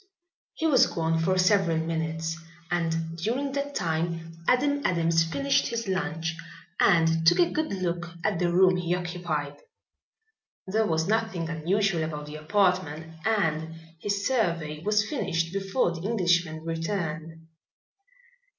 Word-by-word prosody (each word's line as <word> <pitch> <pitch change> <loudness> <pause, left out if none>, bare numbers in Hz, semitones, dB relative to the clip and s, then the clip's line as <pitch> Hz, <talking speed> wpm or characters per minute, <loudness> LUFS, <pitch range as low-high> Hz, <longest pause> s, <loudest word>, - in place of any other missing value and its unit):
He 320 - -2
was 265 -5 +5
gone 165 0 0
for 185 +3 +1
several 185 -3 +3
minutes 160 0 -2 0.4
and 165 -1 -1
during 255 +10 -1
that 285 +1 -3
time 165 0 -2 0.2
Adam 285 +3 +2
Adams 165 -2 +2
finished 275 +12 +1
his 230 -2 -3
lunch 165 -3 -2 0.4
and 165 -2 +4
took - - +6
a 350 -1 +3
good 310 0 -1
look 175 -3 -2
at 200 -6 0
the 175 -1 +1
room 185 +1 +5
he 175 0 0
occupied. 170 -5 -3 1.1
There 215 +3 +1
was 160 -1 0
nothing 215 -6 0
unusual 175 +2 +1
about 150 -2 -4
the 150 +1 -8
apartment 165 -2 0
and 160 -7 0 0.2
his 200 +2 -2
survey 170 -11 0
was 210 +3 +1
finished 165 - -1
before 195 +1 0
the 170 -1 -6
Englishman 175 -6 0
returned. 165 -1 -4
170 Hz, 130 wpm, -27 LUFS, 165-200 Hz, 1.1 s, took